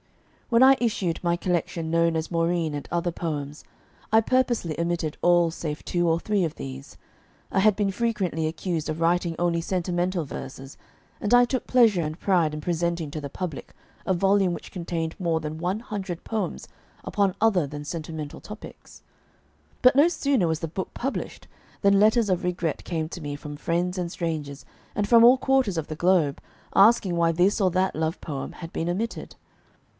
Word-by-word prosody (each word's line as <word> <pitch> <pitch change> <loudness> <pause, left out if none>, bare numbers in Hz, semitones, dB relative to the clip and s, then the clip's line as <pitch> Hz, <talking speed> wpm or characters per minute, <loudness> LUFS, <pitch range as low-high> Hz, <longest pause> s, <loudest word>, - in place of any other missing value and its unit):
When 235 +1 +5
I 270 +1 +8
issued 195 -8 -1
my 170 0 +1
collection 170 -2 -2
known 165 0 +2
as 160 +2 -4
"Maurine, 165 -1 0
and 145 - -5
Other 175 0 0
Poems," 150 -3 -5 0.5
I 220 - +6
purposely 235 - 0
omitted 170 -2 -1
all 175 -1 +4
save 155 -2 -5
two 175 -1 +1
or 165 +1 +2
three 205 +1 0
of 160 -3 -2
these. 65 0 -8 0.5
I 195 - +2
had 210 +1 +4
been 200 -1 0
frequently 195 -7 -1
accused 165 -1 -3
of 155 +1 -3
writing 170 0 +1
only 170 -1 +1
sentimental 175 -1 -1
verses; 135 0 -8 0.5
and 210 +3 +3
I 245 0 +7
took 255 +1 -3
pleasure 230 -8 +4
and 155 +1 -4
pride 175 -6 +2
in 150 - -4
presenting 170 -1 -1
to 155 - -5
the 140 - -5
public 165 -1 -6 0.3
a 190 - +2
volume 195 0 +2
which - - -8
contained 165 -2 -4
more 170 -3 0
than 155 0 -5
one 180 +5 -1
hundred 195 -6 -5
poems 220 -2 -3 0.4
upon 200 -2 +1
other 195 -9 +3
than 145 +1 -7
sentimental 155 -2 -6
topics. 210 +1 -12 0.8
But 255 +1 +7
no 290 +4 +6
sooner 275 - +1
was 160 -1 -1
the 165 - -2
book 180 +4 -5
published 270 +3 -4 0.3
than 200 -1 +4
letters 220 +1 +4
of 185 -1 0
regret 175 -3 -2
came 160 -3 -2
to 175 - -8
me 145 -1 -4
from 145 0 -8
friends 175 +4 -1
and 175 -1 -3
strangers, 155 -5 -4 0.3
and 205 -1 0
from 230 0 +7
all 245 +2 +8
quarters 260 -8 +1
of 160 - -2
the 155 - -5
globe, 170 -4 +2 0.3
asking 200 -3 +5
why 170 -1 +3
this 180 +6 +2
or 190 - +4
that 185 +2 +1
love 160 +1 -1
poem 145 -4 -5
had 165 -1 -9
been 165 - -2
omitted. 215 +6 -3
175 Hz, 180 wpm, -25 LUFS, 160-200 Hz, 0.8 s, I